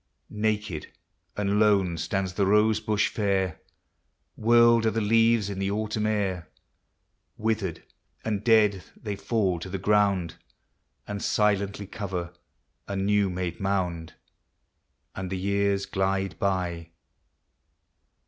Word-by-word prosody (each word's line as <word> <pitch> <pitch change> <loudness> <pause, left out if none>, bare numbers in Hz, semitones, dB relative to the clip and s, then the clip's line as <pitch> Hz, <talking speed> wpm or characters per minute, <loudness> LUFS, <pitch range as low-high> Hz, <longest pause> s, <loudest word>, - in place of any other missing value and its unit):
Naked 105 -6 -2 0.5
and 105 0 +1
lone 100 -5 +3
stands 90 +4 -2
the 100 +1 +1
rose 105 +1 +4
bush 110 -1 +1
fair, 95 -5 -1 0.7
Whirled 115 0 +5
are - - +5
the 115 - -1
leaves 115 0 +3
in 100 -1 -5
the 95 0 0
autumn 105 +1 -1
air, 100 -5 -1 0.9
Withered 110 -6 -2 0.4
and 105 -2 -1
dead 105 -5 +4
they 105 -2 -5
fall 95 -5 0
to 95 - -7
the 95 - -3
ground, 100 -3 +1 0.7
And 100 -1 -4
silently 100 -1 +1
cover 90 -4 -5 0.5
a 100 - -4
new 100 0 +2
made 90 -1 -4
mound. 90 -4 -2 1.0
And 95 -1 -5
the 95 - -3
years 100 +1 0
glide 95 0 -1
by. 90 -4 -1
100 Hz, 120 wpm, -26 LUFS, 95-105 Hz, 1.0 s, Whirled